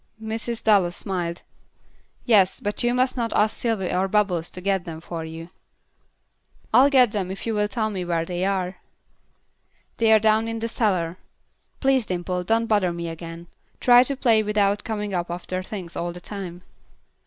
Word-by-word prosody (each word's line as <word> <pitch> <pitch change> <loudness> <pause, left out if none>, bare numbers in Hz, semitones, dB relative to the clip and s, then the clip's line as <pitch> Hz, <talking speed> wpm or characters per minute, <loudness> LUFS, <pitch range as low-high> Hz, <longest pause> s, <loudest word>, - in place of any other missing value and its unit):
Mrs. 225 +1 -4
Dallas 195 -5 +3
smiled. 175 -3 -4 0.8
"Yes, 200 -6 +4
but 205 0 -3
you 240 - +2
must 255 +1 +1
not 235 -3 -2
ask 215 +1 +2
Sylvy 220 -6 -1
or 185 +1 +1
Bubbles 190 -5 +1
to - - -8
get 195 -1 0
them 165 -2 -7
for 165 0 -6
you." 165 +2 -8 1.2
"I'll 260 +5 +7
get 255 -5 +5
them 195 -4 -2
if 190 - -6
you 225 - -1
will 210 -1 +1
tell 220 -1 -2
me 190 -3 -3
where 170 -2 -1
they 180 +1 -3
are." 190 -1 -1 1.2
"They 225 -1 +3
are 220 - +8
down 220 +1 +2
in 225 0 -3
the 225 0 -2
cellar. 185 -7 0 0.6
Please, 265 -4 +2
Dimple, 180 0 -2
don't 225 +3 +2
bother 205 -5 +2
me 170 0 -4
again. 165 +1 -8 0.3
Try 245 0 +7
to 275 +1 -3
play 230 -4 +4
without 205 -1 +1
coming 210 -2 -3
up 175 -1 -2
after 180 +1 -4
things 185 -3 -7
all 175 0 -2
the 175 - -9
time." 180 -2 -7
200 Hz, 175 wpm, -24 LUFS, 175-225 Hz, 1.2 s, are